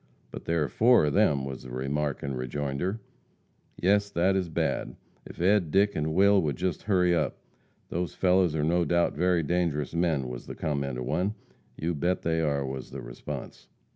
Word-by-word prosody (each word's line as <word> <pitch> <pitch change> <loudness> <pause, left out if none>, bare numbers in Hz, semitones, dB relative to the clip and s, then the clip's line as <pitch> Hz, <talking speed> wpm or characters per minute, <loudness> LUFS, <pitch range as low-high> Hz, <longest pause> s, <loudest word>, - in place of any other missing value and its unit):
"But - - -8
there 85 -2 +1
are - - -1
four 115 - +4
of 75 - 0
them," 70 -2 +3
was 65 -1 -6
the 65 - -10
remark 70 +3 -2
in 70 -1 -3
rejoinder. 70 - -3 0.8
"Yes 100 +2 +3
that 95 +1 +2
is 95 -3 -1
bad. 80 - -1 0.3
If - - -12
Ed, 95 -1 +3
Dick 100 +5 +3
and 80 +1 -1
Will 100 +1 +5
would 75 -5 -1
just 90 -2 -2
hurry 90 -4 +2
up. 85 - 0 0.5
Those 85 -2 -3
fellows 90 -3 +3
are 75 - 0
no 85 +3 +2
doubt 85 +2 +2
very 90 +1 +2
dangerous 80 -2 -1
men," 80 -6 +1
was 60 -1 -7
the - - -6
comment 70 -4 -2
of 65 - -4
one. 90 - -1 0.4
"You 85 +2 -1
bet 85 +4 -1
they 80 0 +1
are," 70 -3 0
was 65 -1 -6
the - - -7
response. - - -8
80 Hz, 190 wpm, -28 LUFS, 70-90 Hz, 0.8 s, Will